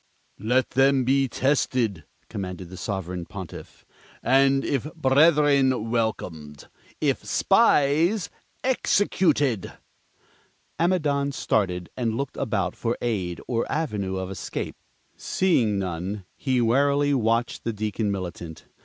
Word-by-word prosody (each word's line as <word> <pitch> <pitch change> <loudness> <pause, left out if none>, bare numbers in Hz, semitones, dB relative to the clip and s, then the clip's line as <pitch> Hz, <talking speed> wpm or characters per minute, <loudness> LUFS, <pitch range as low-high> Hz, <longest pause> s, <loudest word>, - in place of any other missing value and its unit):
"Let 125 +4 +1
them 135 0 +3
be 135 +2 +2
tested," 125 - 0 0.2
commanded 90 -2 -6
the - - -8
Sovereign 90 -4 -4
Pontiff, 95 -4 -9 0.4
"and, 135 +1 +3
if 140 +2 -1
brethren, 140 -5 +3
welcomed; 85 -11 -3 0.3
if - - 0
spies, 160 +8 +3 0.3
executed!" 160 - +1 1.1
Amidon 150 -5 +1
started, 90 -8 -1
and 115 -3 -1
looked 140 0 -4
about 100 -8 -1
for 115 0 -2
aid 95 -8 -2
or 115 -2 -1
avenue 105 -11 -2
of 95 0 -4
escape. 90 -2 -5 0.4
Seeing 125 - +1
none, 95 +1 -4
he 130 -3 0
warily 140 +4 +3
watched 115 -2 0
the 115 - -1
Deacon 105 0 -2
Militant. 85 -4 -6
120 Hz, 110 wpm, -25 LUFS, 95-140 Hz, 1.1 s, them